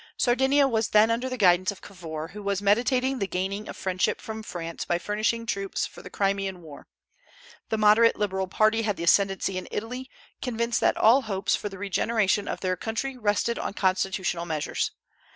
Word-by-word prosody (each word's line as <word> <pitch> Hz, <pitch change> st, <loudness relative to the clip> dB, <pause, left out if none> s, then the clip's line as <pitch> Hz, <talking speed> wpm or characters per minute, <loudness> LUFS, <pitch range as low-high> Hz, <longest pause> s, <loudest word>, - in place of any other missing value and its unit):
Sardinia 265 Hz, +3 st, +3 dB
was 225 Hz, -4 st, 0 dB
then 215 Hz, +2 st, +4 dB
under 245 Hz, +3 st, -1 dB
the 255 Hz, -, -4 dB
guidance 185 Hz, -3 st, +4 dB
of 200 Hz, -, -13 dB
Cavour, 165 Hz, -5 st, -7 dB
who 210 Hz, -, -9 dB
was 200 Hz, -1 st, -1 dB
meditating 250 Hz, +6 st, +2 dB
the 195 Hz, -, -1 dB
gaining 195 Hz, +3 st, -3 dB
of -, -, -7 dB
friendship 185 Hz, -1 st, 0 dB
from 220 Hz, -1 st, -6 dB
France 170 Hz, -5 st, -6 dB
by 175 Hz, -, 0 dB
furnishing 215 Hz, +5 st, -1 dB
troops 195 Hz, -3 st, -2 dB
for -, -, -11 dB
the -, -, -10 dB
Crimean 195 Hz, -2 st, -1 dB
war. 150 Hz, -3 st, -12 dB, 0.8 s
The 220 Hz, -, 0 dB
moderate 215 Hz, +2 st, +5 dB
Liberal 190 Hz, -2 st, -1 dB
party 215 Hz, +4 st, +2 dB
had 210 Hz, -3 st, -1 dB
the -, -, -4 dB
ascendency 195 Hz, +1 st, +2 dB
in -, -, -10 dB
Italy, 250 Hz, +4 st, -5 dB, 0.3 s
convinced 235 Hz, -2 st, -1 dB
that -, -, +2 dB
all 235 Hz, +5 st, +5 dB
hopes 200 Hz, -5 st, 0 dB
for 205 Hz, -, -4 dB
the 195 Hz, -, -10 dB
regeneration 205 Hz, +1 st, 0 dB
of -, -, -4 dB
their 185 Hz, -1 st, 0 dB
country 225 Hz, +7 st, -3 dB
rested 220 Hz, 0 st, 0 dB
on -, -, -4 dB
constitutional 185 Hz, -2 st, 0 dB
measures. 155 Hz, -3 st, -1 dB
205 Hz, 185 wpm, -26 LUFS, 190-230 Hz, 0.8 s, moderate